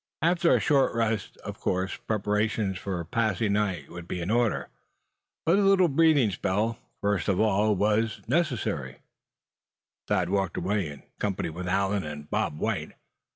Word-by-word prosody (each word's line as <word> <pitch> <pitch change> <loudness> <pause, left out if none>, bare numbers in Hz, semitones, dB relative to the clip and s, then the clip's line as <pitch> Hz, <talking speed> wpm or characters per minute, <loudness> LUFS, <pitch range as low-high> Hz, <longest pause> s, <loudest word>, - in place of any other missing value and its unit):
After 170 +1 +4
a - - +3
short 135 -5 +2
rest, 110 -3 -1
of - - -6
course 95 +1 -1
preparations 105 -2 -1
for 90 -4 -4
passing 110 +1 0
the 105 - +3
night 90 -9 -2
would 85 -1 -8
be 90 - -3
in 85 +4 -2
order; 120 -1 +1 0.8
but 175 +5 +4
a - - +4
little 195 -3 +5
breathing 145 -6 +4
spell, 105 +5 -1 0.2
first 100 -5 0
of 95 - +2
all, 105 0 +3
was 105 +3 +1
in 125 - -1
order. 155 - 0 1.1
Thad 95 -4 +1
walked 95 -3 0
away, 95 -1 0
in 70 -1 -10 0.2
company 95 -5 -2
with 90 +3 -6
Allan 100 +2 +1
and 75 -1 -7
Bob 75 - -1
White. - - -2
105 Hz, 160 wpm, -27 LUFS, 95-115 Hz, 1.1 s, little